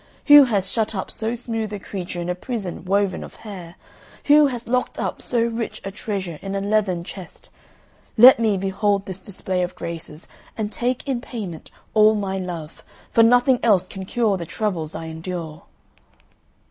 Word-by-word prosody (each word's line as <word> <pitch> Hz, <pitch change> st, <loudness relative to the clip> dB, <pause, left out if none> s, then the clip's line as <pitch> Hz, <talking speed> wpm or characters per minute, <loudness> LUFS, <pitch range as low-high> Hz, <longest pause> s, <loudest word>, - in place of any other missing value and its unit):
Who 290 Hz, -1 st, +9 dB
has 200 Hz, -5 st, -1 dB
shut 220 Hz, -2 st, -1 dB
up 190 Hz, -, -4 dB
so 225 Hz, +2 st, -2 dB
smooth 225 Hz, -3 st, -4 dB
a -, -, -3 dB
creature 180 Hz, -2 st, -6 dB
in 170 Hz, -, -4 dB
a 180 Hz, -, 0 dB
prison 190 Hz, -1 st, -5 dB
woven 195 Hz, +1 st, +1 dB
of -, -, -11 dB
hair? 185 Hz, -6 st, -9 dB, 0.5 s
Who 295 Hz, 0 st, +6 dB
has 245 Hz, -3 st, -5 dB
locked 250 Hz, +1 st, -1 dB
up -, -, -3 dB
so 235 Hz, -2 st, +1 dB
rich 230 Hz, 0 st, -3 dB
a 195 Hz, -, -4 dB
treasure 195 Hz, -5 st, -4 dB
in 195 Hz, 0 st, -4 dB
a -, -, 0 dB
leathern 200 Hz, -4 st, 0 dB
chest? 180 Hz, -1 st, -11 dB, 0.7 s
Let 245 Hz, +2 st, +9 dB
me 215 Hz, -4 st, +2 dB
behold 195 Hz, +1 st, 0 dB
this 190 Hz, -1 st, -6 dB
display 185 Hz, -1 st, -3 dB
of 180 Hz, -, -3 dB
graces, 165 Hz, -1 st, -7 dB, 0.3 s
and 215 Hz, -1 st, -2 dB
take 250 Hz, +4 st, -2 dB
in 255 Hz, -3 st, -1 dB
payment 205 Hz, -, -7 dB, 0.2 s
all 215 Hz, 0 st, +6 dB
my 195 Hz, -2 st, -2 dB
love; 170 Hz, -4 st, -7 dB, 0.3 s
for 230 Hz, -, +5 dB
nothing 245 Hz, +2 st, +5 dB
else 205 Hz, -6 st, +3 dB
can 190 Hz, -1 st, -8 dB
cure 215 Hz, -1 st, +1 dB
the 170 Hz, -, -5 dB
troubles 170 Hz, -8 st, -2 dB
I 165 Hz, -, -5 dB
endure." 160 Hz, -1 st, -6 dB
200 Hz, 175 wpm, -22 LUFS, 180-230 Hz, 0.7 s, Who